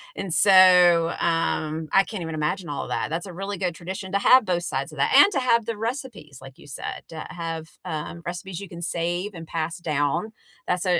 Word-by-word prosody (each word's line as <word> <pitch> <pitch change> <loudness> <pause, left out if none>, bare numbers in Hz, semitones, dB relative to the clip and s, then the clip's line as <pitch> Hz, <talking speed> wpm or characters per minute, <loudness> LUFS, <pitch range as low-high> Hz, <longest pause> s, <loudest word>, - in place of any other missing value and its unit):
and 190 - -5
so, 180 -4 +6
um, 160 -1 -1
I 195 - +5
can't 195 -2 -7
even 160 -1 -5
imagine 155 +3 -2
all 145 - -3
of - - -8
that. - - -2
That's 165 +3 -3
a 185 - -9
really 195 +2 -5
good 180 -2 -2
tradition 185 +2 -7
to 200 - +2
have 255 +3 +6
both 175 -2 -1
sides - - -3
of - - -11
that - - +2
and 405 - +8
to - - +1
have 235 -3 +2
the 230 0 -3
recipes, 225 - -5
like 135 0 -13
you - - -15
said, 135 - -6
to 160 -1 -7
have, 165 -2 -5 0.2
uh, 155 -3 -5
recipes 175 +1 -5
you 200 - -9
can 170 - -9
save 175 +4 -2
and 165 -2 -9
pass 165 +1 -3
down. 160 +5 -1 0.4
That's 180 +1 0
a 175 -2 +2
175 Hz, 225 wpm, -24 LUFS, 165-195 Hz, 0.4 s, and